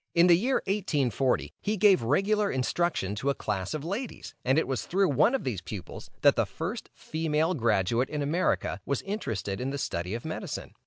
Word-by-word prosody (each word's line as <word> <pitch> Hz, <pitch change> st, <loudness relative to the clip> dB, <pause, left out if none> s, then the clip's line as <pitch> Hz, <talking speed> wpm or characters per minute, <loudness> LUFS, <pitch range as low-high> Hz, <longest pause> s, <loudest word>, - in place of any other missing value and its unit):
In 170 Hz, 0 st, +6 dB
the 175 Hz, -1 st, +7 dB
year 250 Hz, +9 st, +1 dB
1840, 140 Hz, -, 0 dB
he 210 Hz, +1 st, -1 dB
gave 195 Hz, -1 st, +5 dB
regular 200 Hz, -, +2 dB
instruction 130 Hz, -, 0 dB
to 120 Hz, +7 st, -1 dB
a 140 Hz, -, +1 dB
class 100 Hz, +2 st, -3 dB
of 155 Hz, 0 st, -5 dB
ladies, 210 Hz, +8 st, -5 dB
and 130 Hz, +3 st, +2 dB
it 160 Hz, -, +2 dB
was 130 Hz, -6 st, -2 dB
through 195 Hz, 0 st, +2 dB
one 200 Hz, -, +4 dB
of 270 Hz, -, -2 dB
these 110 Hz, -8 st, -2 dB
pupils, 90 Hz, 0 st, -8 dB
that -, -, +6 dB
the -, -, +1 dB
first -, -, -5 dB
female 160 Hz, +1 st, 0 dB
graduate 115 Hz, -, +1 dB
in 150 Hz, -1 st, -2 dB
America 165 Hz, +6 st, 0 dB
was 140 Hz, -, -2 dB
interested 110 Hz, -, -3 dB
in 130 Hz, -, -1 dB
the 140 Hz, -, -3 dB
study 90 Hz, -6 st, -3 dB
of 120 Hz, -, -6 dB
medicine. 160 Hz, -, -5 dB
145 Hz, 195 wpm, -28 LUFS, 115-185 Hz, -, the